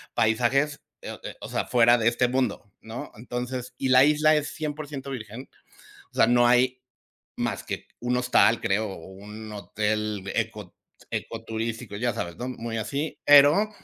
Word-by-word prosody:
paisajes, 125 Hz, +7 st, +2 dB, 0.2 s
eh -, -, -7 dB
eh, -, -, -7 dB
o -, -, -7 dB
sea, -, -, -1 dB
fuera 120 Hz, 0 st, +5 dB
de 110 Hz, -, +1 dB
este 120 Hz, +1 st, +1 dB
mundo, 125 Hz, -6 st, -1 dB
¿no? 115 Hz, +2 st, -8 dB
Entonces, 125 Hz, +2 st, -5 dB
y 130 Hz, -, -1 dB
la 130 Hz, +2 st, +7 dB
isla 155 Hz, +1 st, +4 dB
es 150 Hz, -1 st, -1 dB
100% 145 Hz, -3 st, -5 dB
virgen, 115 Hz, +1 st, -7 dB, 0.6 s
o -, -, -28 dB
sea, -, -, +5 dB
no 120 Hz, 0 st, +4 dB
hay 125 Hz, +1 st, +3 dB, 0.6 s
más -, -, -2 dB
que -, -, -5 dB
un 125 Hz, +1 st, 0 dB
hostal, 125 Hz, -2 st, +4 dB
creo, 110 Hz, -1 st, 0 dB
o 80 Hz, -, -10 dB
un 105 Hz, +3 st, -10 dB
hotel 105 Hz, 0 st, -2 dB
eco -, -, -3 dB, 0.4 s
eco 115 Hz, 0 st, -5 dB
turístico, 110 Hz, -2 st, -4 dB
ya 120 Hz, +2 st, 0 dB
sabes, 85 Hz, -1 st, -5 dB
¿no?, 125 Hz, -, -5 dB
muy 115 Hz, -2 st, -5 dB
así. 140 Hz, +8 st, -3 dB
Pero, 145 Hz, +9 st, +6 dB
120 Hz, 165 wpm, -26 LUFS, 110-130 Hz, 0.6 s, la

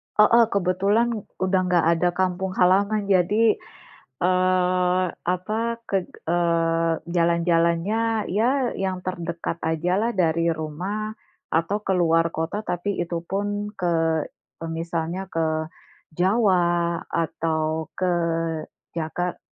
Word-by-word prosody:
Heeh, 230 Hz, +3 st, +6 dB
kebetulan 200 Hz, +4 st, +1 dB, 0.3 s
udah 190 Hz, 0 st, +2 dB
nggak 175 Hz, -2 st, +3 dB
ada 175 Hz, +1 st, +2 dB
kampung 185 Hz, 0 st, -1 dB
halaman 200 Hz, +3 st, +3 dB
jadi, 200 Hz, +3 st, +3 dB, 0.6 s
eee, 185 Hz, +1 st, +2 dB, 0.3 s
apa 210 Hz, +5 st, -3 dB, 0.2 s
ke 195 Hz, -4 st, -1 dB, 0.2 s
eee, 165 Hz, -1 st, +1 dB
jalan-jalannya 170 Hz, +6 st, +1 dB
ya 245 Hz, +4 st, +1 dB
yang 190 Hz, -1 st, -2 dB
terdekat 170 Hz, -2 st, -4 dB
aja 160 Hz, +2 st, -1 dB
lah 230 Hz, +2 st, +1 dB
dari 165 Hz, -1 st, +2 dB
rumah, 180 Hz, +7 st, -3 dB, 0.4 s
atau 165 Hz, +6 st, +1 dB
ke 190 Hz, -, +1 dB
luar 165 Hz, -2 st, +2 dB
kota, 170 Hz, +7 st, -3 dB
tapi 180 Hz, +3 st, -2 dB
itupun 205 Hz, +5 st, -3 dB
ke 170 Hz, -3 st, +1 dB, 0.6 s
e 165 Hz, -, -5 dB
misalnya 165 Hz, +2 st, -3 dB
ke 160 Hz, 0 st, -1 dB, 0.5 s
Jawa, 175 Hz, -4 st, +2 dB
atau 160 Hz, -1 st, -1 dB
ke 185 Hz, -1 st, 0 dB, 0.8 s
Jaka 170 Hz, +2 st, -3 dB
180 Hz, 105 wpm, -24 LUFS, 165-200 Hz, 0.8 s, Heeh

